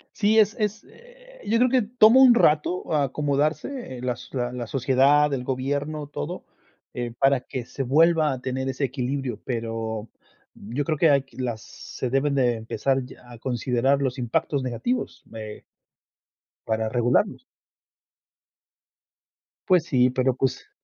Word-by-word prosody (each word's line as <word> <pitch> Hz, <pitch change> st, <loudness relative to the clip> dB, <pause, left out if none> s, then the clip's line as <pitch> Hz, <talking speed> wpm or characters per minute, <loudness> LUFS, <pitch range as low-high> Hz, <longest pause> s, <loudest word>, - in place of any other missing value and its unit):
Sí, 220 Hz, +1 st, +3 dB
es 215 Hz, 0 st, +3 dB
es, 210 Hz, +1 st, -2 dB
eh, -, -, -18 dB
yo 225 Hz, -, +2 dB
creo 250 Hz, +2 st, +4 dB
que 255 Hz, 0 st, +3 dB
tomo 235 Hz, +2 st, +5 dB
un 255 Hz, -2 st, +8 dB
rato 165 Hz, -4 st, +2 dB
acomodarse, 150 Hz, -, -1 dB
eh, -, -, -9 dB
las 125 Hz, -1 st, -4 dB
la 125 Hz, -2 st, -2 dB
la 125 Hz, -2 st, -5 dB
sociedad, 135 Hz, +4 st, +3 dB
el 130 Hz, -2 st, -2 dB
gobierno, 140 Hz, +4 st, -3 dB
todo, 75 Hz, -, -6 dB, 0.5 s
eh, 120 Hz, -1 st, -4 dB
para 135 Hz, 0 st, +3 dB
que 125 Hz, -2 st, -6 dB
se 135 Hz, -, -5 dB
vuelva 155 Hz, +3 st, +3 dB
a 130 Hz, -, -7 dB
tener 130 Hz, +1 st, -3 dB
ese 135 Hz, +1 st, -1 dB
equilibrio, 130 Hz, -2 st, -3 dB
pero, 115 Hz, -2 st, -4 dB, 0.5 s
yo 120 Hz, +8 st, -4 dB
creo 155 Hz, +1 st, -1 dB
que 165 Hz, +2 st, +4 dB
hay 140 Hz, -2 st, +3 dB
que 135 Hz, -, -22 dB
las 120 Hz, -4 st, -3 dB
se 130 Hz, -, -7 dB
deben 140 Hz, +2 st, +1 dB
de 125 Hz, -3 st, +2 dB
empezar 125 Hz, +4 st, -1 dB
ya 125 Hz, -1 st, -15 dB
a 120 Hz, -, -10 dB
considerar 125 Hz, +3 st, 0 dB
los 130 Hz, -1 st, -1 dB
impactos 125 Hz, +3 st, -1 dB
negativos, 130 Hz, -, -3 dB
eh 110 Hz, -1 st, -8 dB, 1.0 s
para 110 Hz, 0 st, -1 dB
regularlos. 125 Hz, -, +1 dB, 2.2 s
Pues 180 Hz, -4 st, +4 dB
sí, 125 Hz, -2 st, +3 dB
pero, 130 Hz, 0 st, 0 dB
pues 130 Hz, 0 st, -2 dB
135 Hz, 150 wpm, -24 LUFS, 125-155 Hz, 2.2 s, un